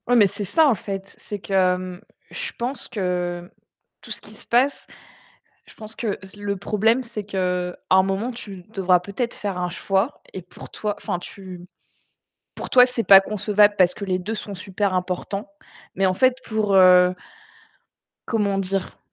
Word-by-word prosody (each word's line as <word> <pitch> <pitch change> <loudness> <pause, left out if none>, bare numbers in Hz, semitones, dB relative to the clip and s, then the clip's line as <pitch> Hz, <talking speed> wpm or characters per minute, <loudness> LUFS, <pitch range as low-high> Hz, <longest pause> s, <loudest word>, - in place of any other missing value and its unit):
Ouais 245 - +3
mais 220 -4 +7
c'est 205 +2 -5
ça 310 - +4
en 270 - +5
fait, 195 -1 -7
c'est 205 - -6
que, 195 - -7
hem, 185 -1 +1 0.3
je 485 0 -4
pense 245 +2 -4
que 180 -5 -3 0.5
tout - - -13
ce - - -4
qui - - -14
se - - -15
passe, 260 +4 +2 0.8
je - - -16
pense 220 0 -10
que 215 -4 -2
z 190 - -14
le 200 -1 -3
problème, 220 +5 +1
c'est 230 -3 -6
qu'à 180 -2 -2
un 190 0 +6
moment, 195 +6 -1
tu 200 -7 -9
devras 185 -3 +3
peut-être 200 +7 -4
faire 195 -3 -4
un 180 0 -1
choix 195 +8 -1
et 190 - -5
pour 180 - -13
toi, 210 -1 -3
enfin, 180 - -3
tu 180 -1 -10 0.9
pour - - -6
toi, 250 -1 +7
c'est 250 -2 -3
pas 195 -1 +9
concevable 210 +1 +2
parce 180 -1 +4
que 205 - -6
les 185 -2 0
2 205 +5 -4
sont 210 -2 -6
super 195 +1 -2
importants. 185 +5 -3 0.5
Mais 195 +1 +2
en 185 - +3
fait, 255 +5 +3
pour, 215 -2 0
heu 180 -1 +7 1.1
comment 205 -4 0
dire? 195 0 -2
195 Hz, 180 wpm, -23 LUFS, 185-215 Hz, 1.1 s, pas